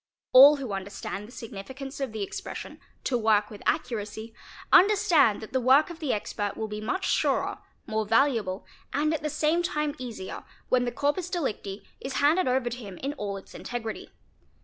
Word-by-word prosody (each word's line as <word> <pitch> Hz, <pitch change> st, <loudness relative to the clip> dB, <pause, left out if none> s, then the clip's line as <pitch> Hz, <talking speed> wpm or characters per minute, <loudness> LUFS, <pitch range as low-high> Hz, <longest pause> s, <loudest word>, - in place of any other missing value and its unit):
All 280 Hz, +4 st, +10 dB
who 270 Hz, -6 st, -5 dB
understand 195 Hz, +1 st, -5 dB
the -, -, -14 dB
signifi 225 Hz, 0 st, -8 dB
cance 275 Hz, 0 st, -7 dB
of 270 Hz, -4 st, -2 dB
the 215 Hz, -2 st, -3 dB
expression -, -, -7 dB, 0.2 s
''to 245 Hz, -3 st, 0 dB
work 215 Hz, -1 st, +2 dB
with 210 Hz, -, -10 dB
accuracy', 225 Hz, -6 st, -2 dB, 0.4 s
understand 355 Hz, -, +5 dB
that 220 Hz, -, -10 dB
the 260 Hz, -, +2 dB
work 270 Hz, +7 st, +5 dB
of 335 Hz, -, -10 dB
the 300 Hz, -6 st, -1 dB
expert 205 Hz, -1 st, -3 dB
will 220 Hz, -, -2 dB
be 210 Hz, 0 st, -5 dB
much 370 Hz, -, -1 dB
surer, -, -, +1 dB, 0.3 s
more 220 Hz, -1 st, -2 dB
valuable, 225 Hz, -5 st, +2 dB, 0.3 s
and 305 Hz, +3 st, +1 dB
at 315 Hz, -, -2 dB
the 300 Hz, -, -2 dB
same 305 Hz, +3 st, +1 dB
time 300 Hz, -4 st, -1 dB
easier, 225 Hz, -7 st, -6 dB, 0.3 s
when 250 Hz, -1 st, +3 dB
the 240 Hz, -, -1 dB
corpus 290 Hz, +8 st, -1 dB
delicti 215 Hz, -, -3 dB, 0.2 s
is 265 Hz, -, -5 dB
handed 305 Hz, +6 st, +3 dB
over 255 Hz, -1 st, +1 dB
to 240 Hz, -, -4 dB
him 200 Hz, -6 st, -9 dB
in 275 Hz, +7 st, -3 dB
all 205 Hz, -7 st, -4 dB
its 195 Hz, -, -13 dB
integrity. 225 Hz, -3 st, -5 dB
250 Hz, 185 wpm, -27 LUFS, 215-290 Hz, 0.4 s, All